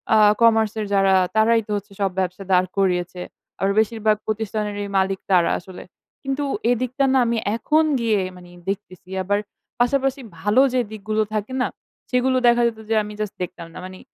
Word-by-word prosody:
আ - - +6 0.2
কমার্সের 220 -2 +3
যারা 195 -1 +4 0.2
তারাই 225 +1 +4
তো - - -6
হচ্ছে 200 0 -9
সব 195 -2 +1
ব্যবসা 185 +1 -2
দাঁড় 185 0 +4
করিয়েছে। 180 -2 0 0.4
আর 195 - +1
বেশিরভাগ 220 -1 +2
প্রতিষ্ঠানেরই 210 -1 -3
মালিক 190 0 +1
তারা 175 -2 +4
আসলে। 180 0 -11 0.4
কিন্তু 270 +2 -2 0.3
এদিকটা 255 +3 0
না 265 - +4
আমি 235 0 0 0.2
এখন 305 +7 +2 0.2
গিয়ে 225 -3 +2 0.2
মানে 175 -1 -14 0.2
দেখতেছি। 185 -2 -6
আবার 205 +2 +1 0.4
পাশাপাশি 270 +2 +1 0.2
ভালো 210 +8 +3
যে 255 - +2
দিকগুলো 215 0 -2
থাকে 215 +5 -3
না? - - +1 0.5
সেগুলো 255 +1 +2
দেখা 240 0 +5
যেত 220 -1 -4
যে 225 - +2
আমি 210 0 -8
জাস্ট 210 -2 -3
দেখতাম 170 -1 -7
না। - - -10
মানে 185 0 -10
215 Hz, 170 wpm, -22 LUFS, 195-230 Hz, 0.5 s, আ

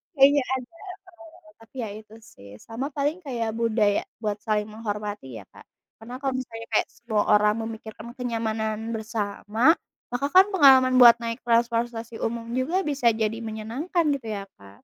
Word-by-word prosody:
Kayaknya 280 0 +5
ada, 255 -1 -9 0.7
eee, 315 -2 -21
tapi 225 +3 -20
ya - - -6
itu 215 +1 -12
sih. 100 - -16
Sama 240 - -5
paling 290 +5 -2
kayak 235 -6 -3
budaya 220 -3 +1 0.2
buat 210 -2 -3
saling 210 -1 0
menghormati 210 - -6
ya, 100 - -13
Kak. - - -14 0.4
Karena 240 +3 -8
kalau 270 -1 -1
misalnya 230 -3 -6
kayak - - +2
semua 220 -3 -1
orang 210 0 +4
memikirkan 220 -1 -8
kenyamanan 225 -2 -3
bersama, 220 +3 0 0.4
maka 245 +3 -1
kan 375 +1 +8
pengalaman 265 -6 +6
buat 240 -2 +10
naik 230 +1 -3
transportasi 235 -1 0
umum 230 0 -3
juga 320 +10 0
bisa 280 -6 +2
jadi 220 0 -1
menyenangkan 230 +11 -2
gitu 255 -5 -8
ya, 205 -2 -4 0.2
Kak. 100 0 -17
230 Hz, 160 wpm, -25 LUFS, 215-255 Hz, 0.7 s, buat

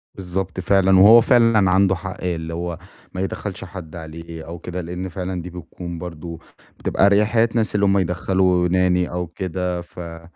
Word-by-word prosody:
بالضبط 95 0 -4
فعلًا، 95 0 +4
وهو 110 +4 +9
فعلًا 115 -5 +4
عنده 95 0 +3
حق 95 +1 -7
اللي 85 -2 -3
هو 85 0 -4 0.4
ما 95 - -3
يدخَّلش 95 0 -4
حد 85 -3 -9
عليه 80 0 -9
أو 85 0 -7
كده، 90 +1 -5
لأن 90 +2 -5
فعلًا 90 0 -4
دي 90 - -8
بتكون 85 0 -8
برضو 85 -1 -7 0.4
بتبقى - - +2
أريحية 105 +3 +3
ناس 110 -2 0
اللي 100 -1 +3
هُم 100 0 +3
يدخَّلوا 90 0 +1
Nanny 90 -1 +2
أو 90 0 -3
كده، 90 0 -3
ف 85 - -14
آه، 85 -1 -8
90 Hz, 175 wpm, -21 LUFS, 85-95 Hz, 0.4 s, وهو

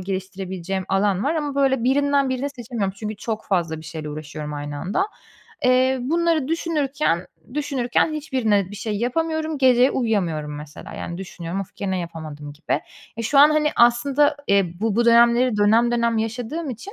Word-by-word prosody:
geliştirebileceğim 190 0 -4
alan 195 +1 +1
var 300 +4 +1
ama, 295 -3 -2
böyle, 270 -3 +2
birinden 280 +1 +2
birini 260 +2 -2
seçemiyorum, 235 -7 -4
çünkü 215 0 -5
çok 220 +1 -4
fazla 170 -5 0
bir - - -13
şeyle 160 -1 -6
uğraşıyorum 150 0 -6
aynı 145 0 -5
anda. 205 - -1 0.6
Eee, 255 +1 +4
bunları 325 +1 +1
düşünürken 295 - 0 0.3
düşünürken 280 -1 0
hiçbirine 250 - 0
bir 205 - -8
şey 210 0 -3
yapamıyorum. 315 +6 -1
Gece 255 0 +5
uyuyamıyorum, 175 - -1
mesela, 150 0 -10
yani, 170 - -6
düşünüyorum, 180 -1 -5
"Of! 195 - -8
Gene 190 -2 -2
yapamadım." 155 -4 -7
gibi. 150 +3 -2 0.4
E, 230 - -3
şu 275 +5 +2
an, 295 +2 +8
hani, 305 0 +2
aslında, 270 +5 +4
eee, 195 -4 +2
bu 220 -1 0
bu 235 - +3
dönemleri 235 0 +5
dönem 220 +3 +4
dönem 235 -1 +1
yaşadığım 245 +8 -3
için, 250 - -8
230 Hz, 165 wpm, -22 LUFS, 190-275 Hz, 0.6 s, an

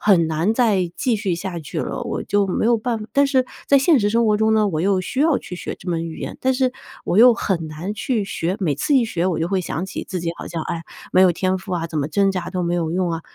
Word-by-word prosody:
很 185 -6 +4
难 160 +7 0
再 205 -8 +2
继 250 -4 +1
续 200 -5 -1
下 180 0 -5
去 150 - -6
了， - - -4
我 - - -3
就 205 -1 +1
没 190 - -1
有 235 0 +3
办 230 0 -2
但 280 0 +4
是 265 -2 +2 0.2
在 280 - +6
现 275 0 +4
实 205 - +2
生 230 +2 +2
活 210 -1 +2
中 220 0 +3
呢， 215 -1 +3
我 155 -5 -1
又 190 +1 +1
需 260 +8 -3
要 310 -2 +4
去 180 - -7
学 - - -5
这 - - -15
门 165 -1 -1
语 160 - -8
言， - - -6
但 260 0 +2
是 255 -1 +1 0.3
我 185 - +1
又 240 +1 +8
很 175 -8 -2
难 160 +7 -5
去 220 0 -1
学， 180 -1 -2
每 170 -8 0
次 155 - 0
一 245 - +4
学 180 -5 -1
我 175 -3 0
就 165 - 0
会 195 -1 0
想 170 0 -3
起 190 - -5
自 185 - -3
己 165 - -2
好 - - -7
像： 165 -2 -4
“哎， 165 -1 -4 0.3
没 185 - +5
有 185 -2 +6
天 185 +2 0
赋 185 0 -8
啊， 165 -1 -2
怎 155 - -3
么 140 - 0
挣 195 +4 +2
扎 185 -2 -3
都 185 -1 -2
没 175 0 0
有 165 -2 -1
用 180 -1 0
啊。” 165 0 -3
190 Hz, 305 characters per minute, -21 LUFS, 170-225 Hz, 0.3 s, 又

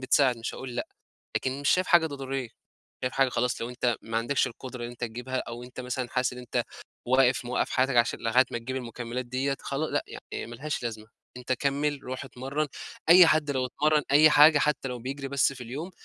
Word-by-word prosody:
بتساعد 130 -1 +3
مش 115 - -5
هاقول 130 -2 -7
لأ، - - -2 0.5
لكن 130 +1 -2
مش 145 - 0
شايف 185 0 +3
حاجة 170 -2 +5
ضرورية، 135 -4 -4 0.5
شايف 125 - -1
حاجة 135 -1 +3
خلاص 125 0 -1
لو 115 - -3
أنت 125 -2 0
ما 115 0 -4
عندكش 120 +5 +1
القدرة 125 0 -7
إن 120 - -5
أنت 120 - -14
تجيبها 125 +3 -4
أو 120 +1 -7
أنت 125 +1 -9
مثلًا 125 0 -3
حاسس 125 0 0
إن 125 - -9
أنت 125 -2 -2 0.4
واقف 130 0 +3
موقّف 125 +1 -1
حياتك 130 0 +1
عشان 120 0 +2
لغاية 120 +3 +4
ما 120 - -2
تجيب 130 +3 -5
المُكملات 120 0 -5
ديّة 135 +3 -1
خلا 140 +3 -2
لأ - - 0 0.3
يعني - - -4
ما 120 - -9
لهاش 150 +5 -4
لازمة، 110 -2 -5 0.3
أنت 125 0 -3
كمّل 140 +2 0
روح 130 +2 -5
اتمرن، 135 +3 -3 0.4
أي 175 0 +9
حد 150 -2 +2
لو 130 -2 0
اتمرن 150 +4 +2
أي 150 +2 +7
حاجة 150 0 +7
حتى 145 -2 0
لو 125 -1 -5
بيجري 135 +3 -5
بس 135 -1 +2
في 135 - -11
اليوم 140 +10 -6
130 Hz, 215 wpm, -27 LUFS, 120-140 Hz, 0.5 s, أي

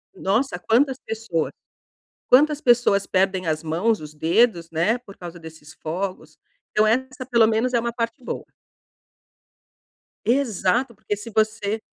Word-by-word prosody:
nossa! 215 +2 0
Quantas 255 +8 +2
pessoas 220 -8 -3 0.8
quantas 295 +3 +5
pessoas 240 -6 +3
perdem 190 -1 +1
as 155 -1 0
mãos, 185 +8 +1
os 150 0 -10
dedos, 170 +2 +2
né, 170 +9 +1
por 205 -5 -15
causa 175 -1 -9
desses 160 -1 -12
fogos. 175 -1 -5 0.3
Então 215 0 +3
essa 260 +3 -1
pelo 235 -3 +5
menos 230 +3 0
é 235 - +4
uma 235 0 -2
parte 230 +2 -3
boa. - - -5 1.8
Exato! 240 -1 +1
Porque 210 0 -3
se 210 +3 -9
você 215 -1 0
215 Hz, 135 wpm, -23 LUFS, 175-240 Hz, 1.8 s, quantas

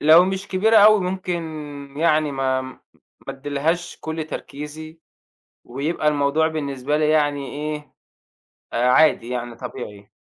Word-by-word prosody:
لو 160 +4 +7
مش 190 +1 -3
كبيرة 220 +4 +3
أوي، 215 0 +7
ممكن 180 -1 -2 0.6
يعني 155 -2 +2
ما 130 -1 0
ما 130 0 -10 0.5
أديلهاش 145 +5 -2
كل 160 0 -4
تركيزي، 155 +3 -8 0.6
ويبقى 150 +5 -2
الموضوع 150 +2 +2
بالنسبة 145 -2 -2
لي 155 0 +2
يعني 145 -3 +1
إيه، 150 -1 -5 0.8
آآ، 120 +1 +1
عادي 140 -4 +4
يعني، 120 -1 -4
طبيعي. 105 -5 -8
150 Hz, 125 wpm, -22 LUFS, 135-165 Hz, 0.8 s, لو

